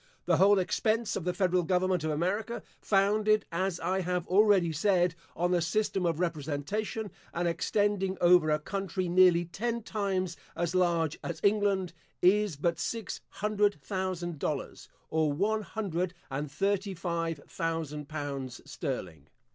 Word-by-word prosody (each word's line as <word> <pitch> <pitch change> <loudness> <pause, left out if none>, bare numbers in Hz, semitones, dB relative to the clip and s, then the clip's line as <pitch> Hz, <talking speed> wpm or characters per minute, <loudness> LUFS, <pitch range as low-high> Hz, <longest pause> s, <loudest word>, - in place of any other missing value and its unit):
The - - +3
whole 200 +1 +6
expense 220 +4 0
of 175 - -4
the 180 - 0
federal 180 -1 +2
government 180 0 +1
of 155 - -1
America, 190 +9 -1 0.2
founded, 210 +1 +3
as 185 +1 -1
I 185 +3 0
have 180 -1 -1
already 195 -3 +4
said, 175 +1 +2 0.2
on 175 +2 0
the 175 -1 +3
system 190 +1 0
of 165 -1 -1
representation, 175 +7 -2 0.2
and 175 +1 0
extending 195 +3 0
over 175 -2 +5
a 150 - +3
country 190 +2 -3
nearly 175 -1 +5
ten 230 +6 -3
times 190 -5 -1 0.2
as 170 0 -1
large 170 -4 +1
as 170 -2 -4
England, 200 -3 +2 0.3
is 200 -1 +3
but 165 +3 0
six 210 +7 -3
hundred 210 -2 0
thousand 175 +1 -3
dollars, 145 -2 -4 0.2
or 155 -1 +2
one 210 +8 +1
hundred 185 -5 -3 0.2
and 140 +1 -3
thirty 195 +4 0
five 165 -2 -2
thousand 155 -3 -3
pounds 140 -5 -4
sterling. 75 -4 -5
180 Hz, 145 wpm, -30 LUFS, 165-200 Hz, 0.3 s, whole